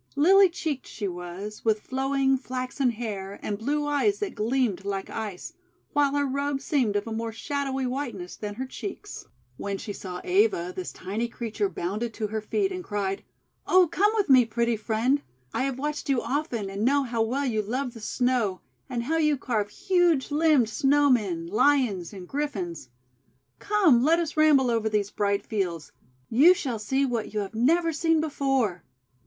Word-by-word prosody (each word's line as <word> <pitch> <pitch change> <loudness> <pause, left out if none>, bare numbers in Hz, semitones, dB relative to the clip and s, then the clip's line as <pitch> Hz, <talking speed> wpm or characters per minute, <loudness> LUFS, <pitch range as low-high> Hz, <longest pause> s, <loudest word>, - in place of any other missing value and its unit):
Lily 380 +6 +6
cheeked 310 -5 -4
she 205 - -4
was, 180 +4 -7
with 220 -1 +2
flowing 270 +1 +1
flaxen 255 0 -2
hair 205 -4 -5
and 205 -1 -3
blue 295 +5 -1
eyes 290 +8 +1
that 410 -2 -3
gleamed 225 -3 0
like 195 -1 -4
Ice; 210 -5 -5 0.4
while 285 -1 +2
her 285 0 +2
robe 280 +1 -1
seemed 265 -7 0
of 205 - 0
a 225 - -6
more 225 0 -3
shadowy 270 +3 -2
whiteness 245 -9 -4
than 205 -1 -6
her 260 +4 -4
cheeks. 400 +9 -7 0.3
When 200 -1 -3
she 205 - -6
saw 180 -2 -6
Eva, 185 -2 +2
this 185 - -5
tiny 205 +6 -3
creature 235 - -3
bounded 215 - -3
to 220 - -2
her 215 +1 -3
feet, 385 - 0
and 365 -1 -5
cried: 195 - -2 0.2
— - - -42
"Oh, 370 -1 +6
come 415 +4 +3
with 420 -3 +1
me, 260 -3 +7
pretty 235 +1 0
Friend. 225 +6 0 0.3
I 260 - 0
have 270 -2 -2
watched 295 +1 -3
you 270 -3 +3
often, 255 -8 -2
and 200 +2 -3
know 280 +3 +3
how 235 -3 -2
well 255 +6 0
you 220 -4 0
love 250 +4 -3
the 225 - -11
Snow, 225 -3 0 0.3
and 235 -1 -2
how 320 +7 0
you 300 -2 +2
carve 220 -6 -1
huge 350 - +1
limbed 300 -4 +4
SnowT 275 +5 +3
men, 185 -8 -1
Lions, 210 -2 +2
and 190 -3 -9
Griffins. 190 - -4 0.7
Come, 370 - +4
let 320 +4 +4
us 330 -3 -2
ramble 295 -5 +5
over 225 -1 +1
these 205 -2 0
bright 200 -1 0
fields. 180 -7 -3 0.4
You 310 +10 +6
shall 250 -9 -3
see 265 +6 +1
what 230 -4 -3
you 210 - +1
have 200 +1 -6
never 325 +9 +2
seen 325 +1 +2
before." 270 - 0
245 Hz, 180 wpm, -26 LUFS, 210-285 Hz, 0.7 s, me